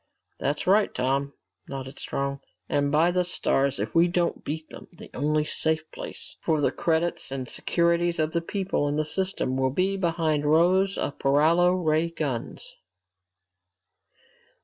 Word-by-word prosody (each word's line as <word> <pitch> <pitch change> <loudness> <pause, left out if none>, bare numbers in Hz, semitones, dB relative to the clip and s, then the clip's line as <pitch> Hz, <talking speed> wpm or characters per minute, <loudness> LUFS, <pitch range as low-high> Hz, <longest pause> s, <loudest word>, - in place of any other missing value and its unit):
"That's 145 +1 -1
right, 205 +3 +3
Tom," 135 +2 0 0.4
nodded 135 0 -7
Strong. 140 0 -3 0.3
"And 145 0 0
by 160 +4 +4
the 180 0 +1
stars, 140 -6 0
if - - -3
we 170 +1 +5
don't 175 0 -1
beat 155 +1 -5
them, - - -11
the 170 - -13
only 150 +2 0
safe 160 +1 +1
place - - -7
left - - -39
for 160 -2 +1
the 145 - +2
credits 165 -3 -1
and 130 -2 -4
securities 170 +3 +1
of 155 0 0
the 170 - 0
people 190 -4 -1
in 145 - -1
the 155 0 0
system 170 -6 0
will 130 0 +2
be 185 +8 0
behind 165 -4 0
rows 180 +6 +3
of - - -3
paralo 160 +6 +4
ray 160 -2 +1
guns!" 145 -8 -5
160 Hz, 155 wpm, -26 LUFS, 140-175 Hz, 0.4 s, we